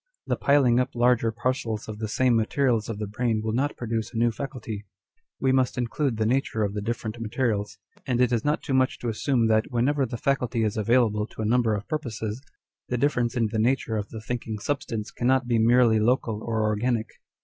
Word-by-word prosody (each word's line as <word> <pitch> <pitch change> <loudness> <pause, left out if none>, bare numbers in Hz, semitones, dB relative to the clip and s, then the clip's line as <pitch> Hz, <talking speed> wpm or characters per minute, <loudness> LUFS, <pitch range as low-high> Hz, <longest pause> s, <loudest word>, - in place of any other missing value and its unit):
The - - 0
piling 135 -4 +3
up 125 - -1
larger 120 -1 +3
parcels 115 -2 -2
of 105 -1 -7
the 110 - -2
same 125 +3 +2
materials 115 0 +1
of 110 - -3
the 105 - -3
brain 110 +1 -1
will 110 - -1
not 140 +5 0
produce 115 -2 -3
a 120 - -6
new 120 +1 +3
faculty: 115 -5 -6 0.5
we 130 - +2
must 130 -1 +1
include 125 +1 -1
the 110 - +1
nature 115 -2 0
of 100 -1 -1
the 105 - -3
different 110 +1 -4
materials, 110 -2 -1 0.3
and 125 -2 +1
it 125 -1 +3
is 115 -2 +1
not 150 +1 0
too 140 - -3
much 130 0 +2
to 120 - -3
assume 115 +2 +1
that 110 0 +2
whenever 130 +3 +1
'the 120 - -5
faculty 125 -2 0
is 105 -2 0
available 110 -1 +2
to 110 - -6
a - - -1
number 115 -1 +2
of 100 +1 -6
purposes, 115 -7 -4 0.5
the 125 - 0
difference 125 -3 +1
in 115 -2 +1
the 110 - -1
nature 115 -1 +1
of 105 -1 -3
the 110 - -7
thinking 115 -1 -4
substance 115 -3 -3
cannot 130 +1 +1
be 120 -2 +2
merely 115 -1 +5
local 110 -1 +1
or 110 -2 -1
organic. 110 +2 0
115 Hz, 210 wpm, -26 LUFS, 110-125 Hz, 0.5 s, merely